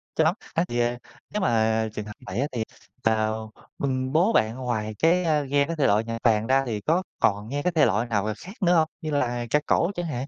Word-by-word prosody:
cho 160 - +3
lắm. 160 +5 +3 0.2
Á, 165 - +2
thì, 120 - -2
ờ, 120 0 +1 0.4
nếu 210 - -1
mà 110 -4 +2
trường 105 - -5
hợp 105 - -8
vậy 95 +6 -4
á, 140 - +1
thì, 115 -3 -2 0.4
ờm, 110 0 0 0.3
ừm, 130 -1 -1
bố 175 +9 +3
bạn 110 +1 +2
ngoài 110 -4 -3
cái, 175 +3 +3
a, 155 -3 +2
nghe 140 +1 +2
cái 165 - -3
thể 145 -4 +2
loại 105 +2 +3
nhạc 115 0 -4
vàng 110 -2 +3
ra 135 +1 +3
thì 110 -4 -3
có 170 - +1 0.2
còn 105 +2 +1
nghe 145 +1 -2
cái 180 - +1
thể 155 - +5
loại 105 +5 +1
nào 105 -1 0
khác 190 +3 -10
nữa 180 -1 +4
hông, 160 -1 +4
như 155 - -3
là 120 -4 0
ca 150 - +3
cổ 170 - +2
chẳng 175 - -3
hạn? 135 -4 -4
125 Hz, 250 wpm, -25 LUFS, 110-155 Hz, 0.4 s, thể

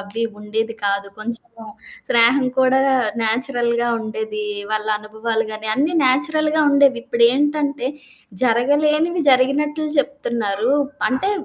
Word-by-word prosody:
అవి 200 +3 -4 0.2
ఉండేది 220 +2 -3
కాదు. 200 0 -1
కొంచము 230 0 -8 0.4
స్నేహం 245 +3 +4
కూడా 260 0 +4 0.4
నేచురల్‌గా 240 +1 0
ఉండేది. 220 -1 -5 0.3
వాళ్ళ 215 0 -2
అనుభవాలు 220 +1 -3
గాని, 215 0 -6
అన్నీ 300 +7 0
నేచురల్‌గా 310 +3 +1
ఉండేవి. 280 -3 +4
ఇప్పుడేంటంటే 275 +2 +1 0.5
జరగలేనివి 300 +8 +2
జరిగినట్లు 295 +4 +1
చెప్తున్నారు. 235 -5 -1 0.4
అంటే 270 +10 0
240 Hz, 100 wpm, -20 LUFS, 220-285 Hz, 0.5 s, స్నేహం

